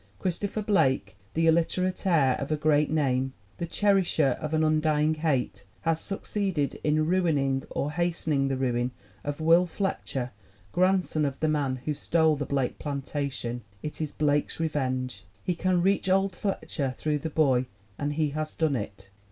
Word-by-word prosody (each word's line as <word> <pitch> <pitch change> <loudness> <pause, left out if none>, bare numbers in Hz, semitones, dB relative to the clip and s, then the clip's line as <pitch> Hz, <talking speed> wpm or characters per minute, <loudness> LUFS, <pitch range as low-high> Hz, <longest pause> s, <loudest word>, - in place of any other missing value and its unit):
Christopher 200 - -2
Blake, 130 - +2 0.2
the 165 0 +2
illiterate 180 +4 +2
heir 145 -8 +4
of 140 +2 -4
a 155 - +2
great 150 0 +3
name, 135 -4 +1 0.2
the 170 - -3
cherisher 190 -6 +3
of 155 - -3
an 160 0 +2
undying 155 0 +2
hate, 135 -10 -1 0.2
has 165 -1 +1
succeeded 195 -6 -2
in 155 +1 +2
ruining 150 -7 +2
or 145 - -2
hastening 160 -4 0
the 135 -1 -1
ruin 125 -1 0 0.3
of 145 +1 -3
Will 165 +3 +5
Fletcher, 140 -9 -2 0.4
grandson 185 -4 +2
of 140 -2 -2
the 155 - +1
man 145 -4 +1
who 150 - 0
stole 160 +1 +2
the 145 -1 -4
Blake 135 -3 -1
plantation. 140 -4 -3 0.2
It 150 - -5
is 155 - -2
Blake's 145 0 0
revenge. 130 -8 -2 0.2
He 180 - 0
can 180 0 +1
reach 195 0 +2
old 195 0 +2
Fletcher 145 -9 -2
through 150 -1 0
the 160 +3 -3
boy 135 -5 +2 0.3
and 145 0 -1
he 155 0 +1
has 155 +1 -4
done 155 -4 +1
it. 100 -3 -6
155 Hz, 160 wpm, -27 LUFS, 135-170 Hz, 0.4 s, Will